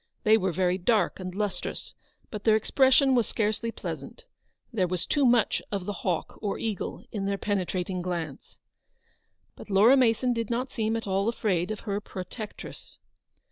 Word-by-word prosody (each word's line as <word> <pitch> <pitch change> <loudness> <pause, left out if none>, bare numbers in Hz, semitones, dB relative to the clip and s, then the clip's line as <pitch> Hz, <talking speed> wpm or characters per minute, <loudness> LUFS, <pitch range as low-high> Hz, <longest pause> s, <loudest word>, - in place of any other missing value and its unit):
They 215 +1 +6
were 190 -4 +1
very 180 +2 +1
dark 215 +2 +2
and 185 -1 -6
lustrous, 205 -1 -3 0.4
but 210 -2 -6
their 220 -1 +5
expression 265 +4 +4
was 240 -4 +3
scarcely 220 +2 -1
pleasant. - - -7 0.5
There 190 -5 +2
was 180 -1 -2
too 285 -3 +3
much 235 -3 +3
of 195 -3 -2
the 205 - -2
hawk 180 -4 -2
or 205 -2 -1
eagle 215 -4 -4
in 200 -3 -2
their 200 0 0
penetrating 185 -2 -1
glance. 170 -5 -5 1.0
But - - -12
Laura 210 +7 +6
Mason 250 -1 +3
did 230 -2 -2
not 250 +2 -1
seem 225 -1 0
at 225 - -5
all 195 +2 +1
afraid 190 -7 0
of 215 -1 -4
her 205 -1 -2
protectress. 205 +3 -8
210 Hz, 165 wpm, -27 LUFS, 185-230 Hz, 1.0 s, They